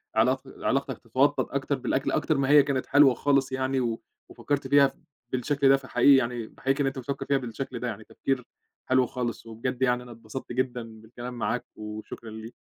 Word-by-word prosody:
علاق - - +3 0.2
علاقتك - - 0
تتوطّد - - +1
أكتر - - -1
بالأكل - - -1
أكتر 155 - +1
ما 135 0 +1
هي 145 -1 +8
كانت 135 -2 -1
حلوة 145 -2 +6
خالص 135 +1 +1
يعني، 130 0 0
و 115 -3 -1 0.3
وفكّرت 145 -1 -2
فيها 140 -1 +6
ف 135 - -10 0.4
بالشكل 135 +2 +2
ده، 135 - +7
فحقيقي 135 +1 +4
يعني 120 -3 0
باحييك 135 +1 -1
إن 135 - +2
أنت 135 0 -3
بتفكّر 135 +3 -4
فيها 140 - +2
بالشكل 130 +1 -5
ده، 125 - -3
يعني 110 -2 -5
تفكير 130 +4 -2 0.5
حلو 130 0 +4
خالص 120 -2 -4
وبجد 120 +3 -4
يعني 125 -1 +2
أنا 125 - -12
اتبسطت 115 +3 -8
جدًا 120 -3 -3
بالكلام 120 +2 -8
معاك 120 0 -2
وشكرًا 110 +1 -8
ليك. 110 +2 -9
130 Hz, 190 wpm, -27 LUFS, 120-135 Hz, 0.5 s, هي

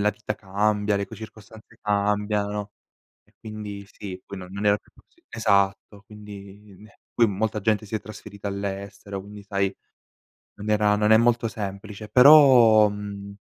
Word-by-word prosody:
la 105 +1 +3
vita 105 0 -5
cambia, 105 +1 0
le 100 - -2
co - - -11
circostanze 110 +1 -13
cambiano 105 0 -1 0.5
e - - -34
quindi 105 -2 -8
sì, 95 -3 -9
quello 95 -2 -9
non 100 +2 -4
era 100 0 +4
più - - -29
possi - - -27
esatto, 100 -2 0
quindi 105 -1 -12
ne 105 0 -18 0.2
poi 115 -2 +4
molta 105 +2 -2
gente 110 +1 0
si 105 - -7
è 110 - -1
trasferita 105 -1 -9
all'estero, 100 0 -6
quindi 100 +1 -12
sai, 100 -1 -1 0.8
non 105 +1 -7
era 105 -1 +3
non 105 +1 +2
è 110 - +8
molto 115 0 +2
semplice, 105 0 -7
però, 125 -6 +7
mhmm, 100 -1 -7
105 Hz, 155 wpm, -24 LUFS, 100-110 Hz, 0.8 s, è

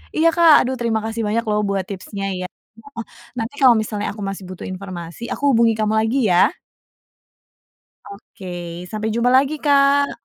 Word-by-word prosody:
Iya, 320 +1 +3
Kak. 335 -2 +6
Aduh, 260 +1 -2
terima 230 -2 0
kasih 225 +1 -3
banyak 230 +3 0
loh 210 0 +1
buat 195 -2 -1
tipsnya, 195 0 -6
ya 185 - -4 0.3
heeh. 230 0 -9 0.3
Nanti 230 +4 -4
kalau 250 -3 +7
misalnya 210 -1 -4
aku 210 - -10
masih 195 0 -7
butuh 185 - -8
informasi, 185 -1 -8
aku - - -9
hubungi 230 -1 +4
kamu 215 0 +1
lagi, 225 +5 0
ya? 175 - +5 1.6
Oke. 175 -3 -9
Sampai 215 +2 -3
jumpa 235 +2 +1
lagi, 275 +3 +3
Kak. 280 -1 +3
220 Hz, 165 wpm, -20 LUFS, 195-250 Hz, 1.6 s, kalau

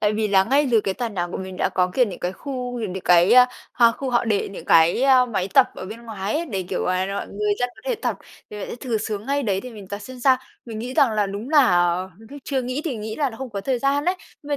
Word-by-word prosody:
Tại 210 0 +2
vì 215 0 0
là 190 -1 +4
ngay 280 +6 +2
dưới 230 -3 +4
cái 195 -2 -2
tòa 240 +1 -3
nhà 185 -5 -3
của 175 - -6
mình 190 -1 -7
đã - - +1
có, 180 0 0
kiểu, 255 - +4
những 200 -6 -7
cái 180 - -3
khu 250 +2 -5
nhìn 210 -5 -3
được 190 - -5
cái 175 +3 +5 0.4
h 245 - -2
khu 270 -2 -4
họ 240 0 +2
để 210 -3 0
những 195 - -9
cái 165 +9 +4 0.3
máy 190 -2 -1
tập - - +7
ở - - -7
bên 225 +4 -9
ngoài 210 -3 -4
ấy 335 +2 -1
để, 195 - -3
kiểu 190 - -2
là, 185 +1 0
mọi 195 +1 -4
người 210 +1 -1
dân 245 - 0
có - - -17
thể - - +1
tập, - - -2 0.3
vì 210 - -7
vậy - - -5
sẽ - - -6
thử 235 -2 -2
xuống 210 0 -4
ngay 280 +1 0
đấy 195 -6 0
để 250 - -9
mình 205 -5 -11
tập 205 - -5
xem 250 +4 -10
sao. 260 0 +5 0.3
Mình 225 -2 -6
nghĩ 245 +3 -5
rằng 255 -5 +4
là 210 -1 +1
đúng 200 +5 -6
là 180 - +4 0.2
lúc 225 +6 -12
chưa 265 -3 -1
nghĩ 255 +3 -3
thì 285 -8 -2
nghĩ 215 0 -6
là 285 -3 0
nó 225 - -11
không 265 -2 -7
có 200 -2 -4
thời 255 +4 -1
gian 275 +3 +1
á, 360 +2 +2 0.3
nhưng 290 - -12
220 Hz, 290 wpm, -22 LUFS, 195-255 Hz, 0.4 s, tập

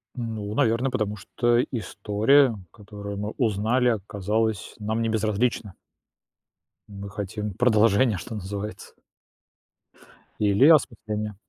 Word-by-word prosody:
Ну, 110 -4 -4
наверное, 115 +4 +1
потому 105 -4 -1
что 120 +6 +1
история, 115 +4 +2 0.2
которую 100 -1 -8
мы 105 +1 -3
узнали, 115 +1 +1
оказалась 105 0 -2
нам 110 +2 -2
не 115 - 0
безразлична. 110 -1 -1 1.2
Мы 100 0 -8
хотим 105 0 -5
продолжения, 110 -1 +3
что 115 - -8
называется. 100 +2 -6 1.5
Или 105 +6 +4
осмысления. 110 -9 +2
105 Hz, 100 wpm, -25 LUFS, 100-115 Hz, 1.5 s, Или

